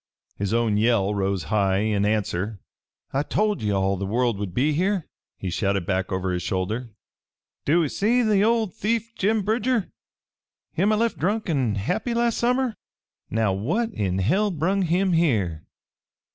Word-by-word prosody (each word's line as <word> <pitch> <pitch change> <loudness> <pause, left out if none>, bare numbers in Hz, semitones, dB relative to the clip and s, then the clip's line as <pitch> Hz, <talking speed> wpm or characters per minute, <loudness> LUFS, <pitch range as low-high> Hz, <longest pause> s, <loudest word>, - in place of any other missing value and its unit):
His 100 -1 -2
own 115 -2 +2
yell 105 -2 +2
rose 95 -3 -1
high 100 -2 +1
in 105 -2 +1
answer. 105 -1 -1 0.5
"I 135 - +2
told 210 +7 0
ye 105 - -1
all 95 -1 +1
the 100 - -3
world'd 110 -3 0
be 140 - +1
here!" 185 +2 0 0.3
he 95 - -4
shouted 100 0 0
back 95 0 -1
over 95 0 -1
his 90 0 -1
shoulder. 100 +8 -2 0.8
"Do 165 +4 +3
ee - - 0
see 230 - +2
that 210 -3 +3
old 220 -3 +2
thief 230 +2 -1
Jim 215 0 +1
Bridger? 225 +1 0 0.8
Him 195 +6 +2
I - - +3
left 230 -4 0
drunk 205 +4 0
an' 130 -8 +1
happy 115 - -1
last 235 -1 +1
summer? 250 0 +1 0.6
Now 110 -3 +1
what 175 - -1
in 95 - -1
hell 185 - +2
brung 185 +3 0
him 180 +2 +1
here?" 105 - +1
125 Hz, 160 wpm, -24 LUFS, -, 0.8 s, Do